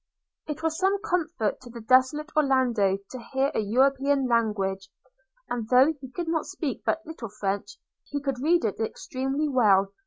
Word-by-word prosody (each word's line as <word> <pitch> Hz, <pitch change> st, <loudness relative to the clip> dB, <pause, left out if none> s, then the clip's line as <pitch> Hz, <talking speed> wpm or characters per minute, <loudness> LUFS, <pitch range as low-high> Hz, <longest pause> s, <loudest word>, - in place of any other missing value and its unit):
It 305 Hz, +1 st, -5 dB
was 320 Hz, +1 st, -1 dB
some 390 Hz, +1 st, +2 dB
comfort 335 Hz, -, -1 dB
to 245 Hz, -, -12 dB
the 235 Hz, 0 st, -9 dB
desolate 260 Hz, +7 st, +2 dB
Orlando 250 Hz, -9 st, +2 dB
to 255 Hz, -, -6 dB
hear 270 Hz, +2 st, +2 dB
a -, -, 0 dB
European 270 Hz, +5 st, +2 dB
language; 200 Hz, -5 st, 0 dB, 0.6 s
and 230 Hz, -3 st, -4 dB
though 260 Hz, +5 st, +5 dB
he 265 Hz, -, -8 dB
could 345 Hz, +7 st, -4 dB, 0.2 s
speak 280 Hz, -7 st, -4 dB
but 325 Hz, +2 st, -1 dB
little 310 Hz, -9 st, -7 dB
French, 200 Hz, 0 st, -3 dB, 0.3 s
he 285 Hz, -, -3 dB
could 275 Hz, -3 st, -3 dB
read 335 Hz, 0 st, +3 dB
it 210 Hz, -, -2 dB
extremely 270 Hz, +6 st, -2 dB
well. 200 Hz, -7 st, +3 dB
260 Hz, 160 wpm, -26 LUFS, 220-300 Hz, 0.6 s, though